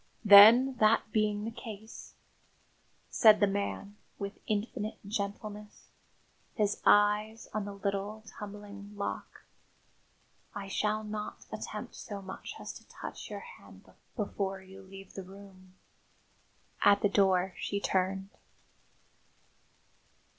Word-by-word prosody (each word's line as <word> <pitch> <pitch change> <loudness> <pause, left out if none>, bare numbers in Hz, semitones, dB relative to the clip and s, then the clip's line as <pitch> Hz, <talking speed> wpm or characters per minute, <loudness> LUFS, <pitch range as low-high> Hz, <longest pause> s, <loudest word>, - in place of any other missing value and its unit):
"Then, 225 +6 +9
that 215 0 +3
being 210 -1 +1
the 225 - -3
case," 220 -1 -10 1.0
said 215 -2 +6
the 205 - +5
man, 200 +1 -3 0.2
with 200 0 -6
infinite 215 +1 -2
gentleness, 205 0 -5 0.7
his 210 -3 0
eyes 210 +2 +3
on 215 -1 -2
the 205 - -6
little, 200 +2 -3
tumbling 205 -1 -10
lock, 200 - -5 1.1
"I 200 -1 -5
shall 215 +2 0
not 210 0 -6
attempt - - -6
so 205 -2 -7
much 190 -1 -8
as - - -7
to - - -24
touch - - -8
your - - -6
hand 475 +1 -14 0.3
before 200 -3 -2
you 190 +1 -13
leave 195 0 -12
the 195 - -6
room." 190 -1 -14 1.1
At 200 0 +5
the - - +6
door 190 -2 +3
she 200 - -2
turned. 190 0 -1
205 Hz, 115 wpm, -31 LUFS, 195-215 Hz, 1.1 s, Then